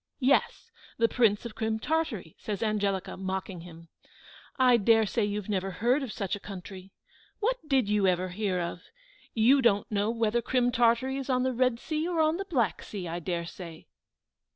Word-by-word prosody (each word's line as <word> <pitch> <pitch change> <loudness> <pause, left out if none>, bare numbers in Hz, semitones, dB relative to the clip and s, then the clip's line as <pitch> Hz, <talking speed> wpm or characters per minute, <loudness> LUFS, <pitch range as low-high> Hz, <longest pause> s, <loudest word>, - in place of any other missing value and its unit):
"Yes, 275 +1 +1 0.3
the 230 - +4
Prince 225 -3 +2
of 235 - -6
Crim 220 0 -1
Tartary," 225 - -2
said 210 0 -4
Angelica, 200 -3 -1
mocking 190 -1 -4
him. 165 -1 -13 0.7
"I 250 -2 +5
dare 225 +1 +4
say 210 +3 0
you 205 0 -2
never 195 -2 -1
heard 240 +9 +1
of 265 -5 -4
such 195 -3 -3
a - - -8
country. 190 -1 -9 0.5
What - - +1
did 265 -6 +2
you 205 -2 +2
ever 185 0 +1
hear 185 -1 -1
of? 170 -1 -4 0.5
You 250 +5 +5
don't 205 -4 +2
know 205 +1 +1
whether 230 0 +1
Crim 245 0 +1
Tartary 240 +2 +2
is 275 0 -5
on 255 -1 +2
the 260 0 0
Red 250 -1 +1
Sea, 310 +3 -2
or 350 -2 -1
on 315 +1 +3
the 390 - -4
Black 245 - 0
Sea, 190 -4 -6
I 170 +1 -3
dare 170 0 -3
say." 170 -2 -10
220 Hz, 185 wpm, -28 LUFS, 190-255 Hz, 0.7 s, I